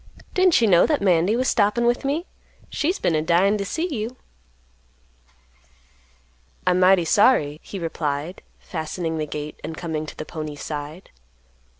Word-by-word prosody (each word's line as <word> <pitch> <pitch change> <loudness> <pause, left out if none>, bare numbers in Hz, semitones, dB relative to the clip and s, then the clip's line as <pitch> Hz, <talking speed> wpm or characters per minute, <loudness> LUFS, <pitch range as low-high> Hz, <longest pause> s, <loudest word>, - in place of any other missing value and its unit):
"Didn't 370 -7 +4
you 225 - +4
know 175 -4 +5
that 295 -9 0
Mandy 180 +2 +3
was 255 +2 0
stoppin' 215 +2 +2
with 240 +1 +1
me? 295 +6 -1 0.5
She's 345 +6 0
been 170 - 0
a 155 - +1
dyin' 180 +6 +3
to - - -1
see 320 - -2
you." 245 -5 -4 2.5
"I'm 180 0 +3
mighty 185 -1 +5
sorry," 155 - +3
he 200 - -8
replied, 160 -1 -3 0.2
fastening 160 0 -4
the 155 - -2
gate 150 0 -6
and 160 +1 -6
coming 155 -2 -4
to - - -9
the 155 - -5
pony's 155 -3 -6
side. 150 +3 -7
180 Hz, 155 wpm, -23 LUFS, 155-225 Hz, 2.5 s, know